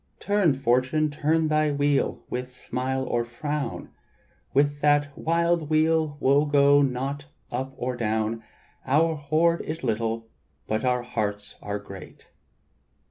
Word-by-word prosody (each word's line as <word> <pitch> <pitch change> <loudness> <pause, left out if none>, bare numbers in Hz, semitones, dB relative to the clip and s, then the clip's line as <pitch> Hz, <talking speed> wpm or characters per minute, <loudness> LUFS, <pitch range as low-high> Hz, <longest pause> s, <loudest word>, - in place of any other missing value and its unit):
"Turn, 205 -8 +2
Fortune, 135 +4 +1
turn 155 +2 +1
thy 155 -1 +2
wheel 145 0 0
with 125 +1 -4
smile 130 +1 -3
or 120 -2 0
frown; 145 +5 -4 0.6
With 145 +1 +2
that 145 -1 +2
wild 170 -1 +1
wheel 155 -1 +2
wo 140 +2 +3
go 145 0 +5
not 135 +2 -2 0.3
up 130 +2 -4
or 125 +1 -2
down; 110 -1 -1 0.4
Our 160 +5 +3
hoard 160 +3 +1
is 155 0 -6
little, 115 -1 -1 0.4
but 110 +2 -1
our 125 -1 +1
hearts 105 -4 -3
are 100 0 -3
great. 100 -2 -12
140 Hz, 130 wpm, -25 LUFS, 125-155 Hz, 0.6 s, go